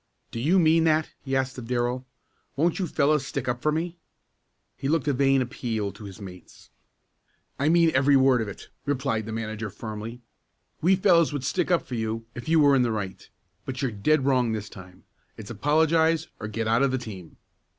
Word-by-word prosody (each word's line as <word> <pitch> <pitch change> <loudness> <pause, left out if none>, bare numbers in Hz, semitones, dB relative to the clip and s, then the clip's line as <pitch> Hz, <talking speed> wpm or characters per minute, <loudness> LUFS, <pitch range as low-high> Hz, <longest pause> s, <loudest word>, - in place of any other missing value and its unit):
"Do 115 - -5
you 160 +10 +3
mean 165 -1 +4
that?" 155 -1 +2
he 135 -1 -2
asked 130 -1 -1
of 115 - -8
Darrell. 125 +1 -1 0.5
"Won't 165 +6 +1
you 185 - -1
fellows 150 -1 +2
stick 135 -1 -4
up 120 0 -1
for 150 - +2
me?" 170 +2 -3 0.8
He 135 - -4
looked 155 -2 +1
a 145 - +3
vain 135 0 +3
appeal 115 -4 -3
to 105 - -12
his 95 -2 -10
mates. 90 -3 -12 0.9
"I 145 +3 +2
mean 165 0 +4
every 135 +2 +4
word 130 -2 +4
of 110 - -3
it," 100 - -9
replied 130 -6 -1
the - - -5
manager 110 -1 -4
firmly. 110 +3 -7 0.6
"We 185 +4 +4
fellows 175 -5 +4
would 145 -3 -3
stick 135 - -1
up 175 -2 +2
for - - -8
you 115 0 -3
if 120 +4 -7
you 165 0 +4
were 145 -2 +5
in 130 - +4
the 120 -2 +1
right, 100 -4 -5 0.3
but 135 0 -5
you're 130 - 0
dead 135 +7 +1
wrong 125 -4 +2
this 105 -1 -4
time. 95 -3 -13 0.3
It's - - -8
apologize 160 +1 +2
or 105 - -5
get 110 +1 -3
out 115 +3 +3
of 140 - +3
the 130 - 0
team!" 100 -9 -9
130 Hz, 200 wpm, -26 LUFS, 110-155 Hz, 0.9 s, were